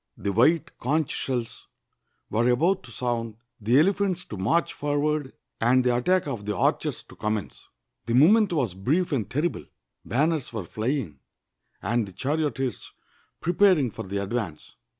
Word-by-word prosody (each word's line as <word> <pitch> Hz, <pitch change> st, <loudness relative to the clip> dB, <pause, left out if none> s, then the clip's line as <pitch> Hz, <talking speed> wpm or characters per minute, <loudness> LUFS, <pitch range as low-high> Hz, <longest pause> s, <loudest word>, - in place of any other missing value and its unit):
The 100 Hz, -, -2 dB
white 160 Hz, -, +3 dB
conch 150 Hz, +3 st, 0 dB
sheUs 120 Hz, -3 st, -3 dB, 0.7 s
were 115 Hz, +3 st, +2 dB
about 170 Hz, +10 st, +2 dB
to 120 Hz, -, -12 dB
sound, 115 Hz, -3 st, -3 dB, 0.2 s
the 115 Hz, +4 st, +3 dB
elephants 185 Hz, +1 st, +1 dB
to -, -, -7 dB
march 125 Hz, -, +1 dB
for 145 Hz, 0 st, -1 dB
ward, 150 Hz, -2 st, -1 dB, 0.3 s
and 125 Hz, +3 st, +4 dB
the 125 Hz, -1 st, +2 dB
attack 180 Hz, +9 st, +2 dB
of 115 Hz, -8 st, -5 dB
the 105 Hz, -2 st, -1 dB
archers -, -, 0 dB
to -, -, -16 dB
commence. 105 Hz, -1 st, -4 dB, 0.4 s
The 115 Hz, -, +1 dB
moment 200 Hz, -, +6 dB
was 135 Hz, -, 0 dB
brief 145 Hz, -, 0 dB
and 115 Hz, -8 st, -1 dB
terrible. 155 Hz, +6 st, -1 dB, 0.4 s
Banners 150 Hz, +2 st, 0 dB
were 110 Hz, -4 st, -4 dB
fl}'ing, 110 Hz, -, -3 dB, 0.6 s
and 115 Hz, -1 st, 0 dB
the 95 Hz, -, -11 dB
charioteers 135 Hz, -, -2 dB, 0.5 s
preparing 175 Hz, -, +3 dB
for -, -, -7 dB
the 100 Hz, +1 st, -3 dB
advance. 100 Hz, -6 st, -4 dB
130 Hz, 150 wpm, -26 LUFS, 110-155 Hz, 0.7 s, moment